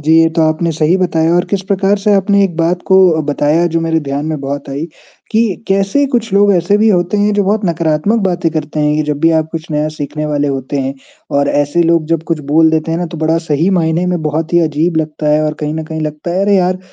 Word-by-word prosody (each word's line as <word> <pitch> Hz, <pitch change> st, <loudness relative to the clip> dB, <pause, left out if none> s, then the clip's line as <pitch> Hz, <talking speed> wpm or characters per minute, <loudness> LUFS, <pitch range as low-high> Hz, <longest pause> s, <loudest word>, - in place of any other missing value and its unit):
जी 155 Hz, +2 st, +1 dB
ये 165 Hz, -, +4 dB
तो 165 Hz, 0 st, 0 dB
आपने 160 Hz, +2 st, -1 dB
सही 160 Hz, +3 st, +1 dB
बताया 165 Hz, -3 st, +1 dB
और 175 Hz, -, +2 dB
किस 195 Hz, -2 st, -1 dB
प्रकार 200 Hz, +1 st, +2 dB
से 205 Hz, +1 st, +1 dB
आपने 200 Hz, +1 st, +2 dB
एक 175 Hz, -4 st, -3 dB
बात 170 Hz, +2 st, 0 dB
को 190 Hz, -, +4 dB, 0.3 s
बताया 150 Hz, +3 st, +1 dB
जो 165 Hz, -1 st, -1 dB
मेरे 165 Hz, 0 st, 0 dB
ध्यान 140 Hz, 0 st, -4 dB
में 155 Hz, -2 st, -3 dB
बहुत 140 Hz, +1 st, -5 dB
आई, 140 Hz, +3 st, -3 dB, 0.5 s
कि 225 Hz, -2 st, 0 dB
कैसे 195 Hz, +8 st, +1 dB
कुछ 230 Hz, -3 st, -1 dB
लोग 200 Hz, +1 st, +4 dB
ऐसे 180 Hz, +3 st, +2 dB
भी 220 Hz, +1 st, +3 dB
होते 180 Hz, +1 st, +1 dB
हैं 205 Hz, +1 st, +2 dB
जो 205 Hz, -1 st, +1 dB
बहुत 210 Hz, +2 st, 0 dB
नकारात्मक 170 Hz, +6 st, 0 dB
बातें 175 Hz, -2 st, 0 dB
करते 155 Hz, -1 st, -3 dB
हैं 150 Hz, 0 st, +1 dB
कि 155 Hz, -, +1 dB
जब 145 Hz, -, -2 dB
भी 165 Hz, +1 st, +4 dB
आप 155 Hz, 0 st, -2 dB
कुछ 165 Hz, 0 st, -6 dB
नया 150 Hz, 0 st, 0 dB
सीखने 150 Hz, +1 st, -4 dB
वाले 145 Hz, -1 st, -1 dB
होते 135 Hz, +1 st, -3 dB
हैं 135 Hz, +1 st, -3 dB, 0.4 s
और 140 Hz, -, +1 dB
ऐसे 145 Hz, +4 st, +1 dB
लोग 165 Hz, -1 st, +2 dB
जब 165 Hz, -1 st, 0 dB
कुछ 165 Hz, -2 st, -1 dB
बोल 160 Hz, +1 st, +5 dB
देते 160 Hz, 0 st, -1 dB
हैं 165 Hz, -, -1 dB
ना 175 Hz, -, -2 dB
तो 170 Hz, -, -8 dB
बड़ा 160 Hz, +1 st, +1 dB
सही 155 Hz, +5 st, +1 dB
मायने 165 Hz, +2 st, 0 dB
में 180 Hz, -2 st, -1 dB
बहुत 155 Hz, +2 st, -2 dB
ही 175 Hz, -, +4 dB
अजीब 160 Hz, +1 st, 0 dB
लगता 155 Hz, -1 st, -2 dB
है 155 Hz, +1 st, +2 dB
और 155 Hz, 0 st, -2 dB
कहीं 150 Hz, 0 st, -2 dB
न 160 Hz, -, -4 dB
कहीं 160 Hz, 0 st, -6 dB
लगता 155 Hz, +2 st, -4 dB
है 185 Hz, -, 0 dB
अरे 200 Hz, 0 st, +3 dB
यार, 185 Hz, 0 st, +1 dB
165 Hz, 255 wpm, -14 LUFS, 150-185 Hz, 0.5 s, बोल